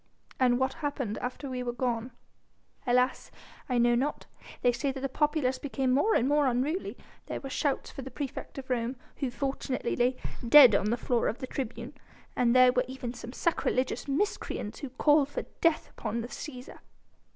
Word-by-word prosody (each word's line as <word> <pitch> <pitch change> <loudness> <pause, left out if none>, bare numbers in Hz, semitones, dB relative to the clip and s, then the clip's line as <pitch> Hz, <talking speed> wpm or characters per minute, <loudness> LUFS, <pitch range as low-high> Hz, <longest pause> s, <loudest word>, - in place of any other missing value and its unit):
"And 250 -2 +4
what 260 +1 0
happened 270 -7 -2
after 255 +3 -5
we 255 -1 -3
were 245 -1 -2
gone?" 245 -1 -1 0.8
"Alas! 250 +1 +2 0.4
I 250 - +1
know 240 0 +4
not. 270 +5 -1 0.4
They 245 - +5
say 245 +3 -1
that 265 - -6
the 275 - 0
populace 295 -2 0
became 265 -2 -1
more 290 +13 +3
and 245 - +3
more 290 0 +3
unruly: 270 +9 -1 0.3
there - - -4
were 270 - -7
shouts 285 -1 -1
for - - -7
the 265 - -7
praefect 275 +2 -6
of 265 -1 -6
Rome, 240 +1 0 0.2
who 270 - -1
fortunately 270 -1 -2
lay 250 +1 +2 0.3
dead 265 -4 +10
on 200 +1 +2
the 235 - +1
floor 240 0 0
of 225 - -1
the - - -5
tribune, 250 0 -5 0.4
and 240 0 +3
there 255 0 +7
were 250 +1 +1
even 255 -2 -5
some 240 -1 -8
sacrilegious 260 -4 0
miscreants 280 - -2
who 280 - -5
called 290 +2 +3
for - - -4 0.2
death 330 -2 +2
upon 230 +2 -3
the 235 - -6
Cæsar." 270 -2 -8
255 Hz, 185 wpm, -29 LUFS, 245-275 Hz, 0.8 s, dead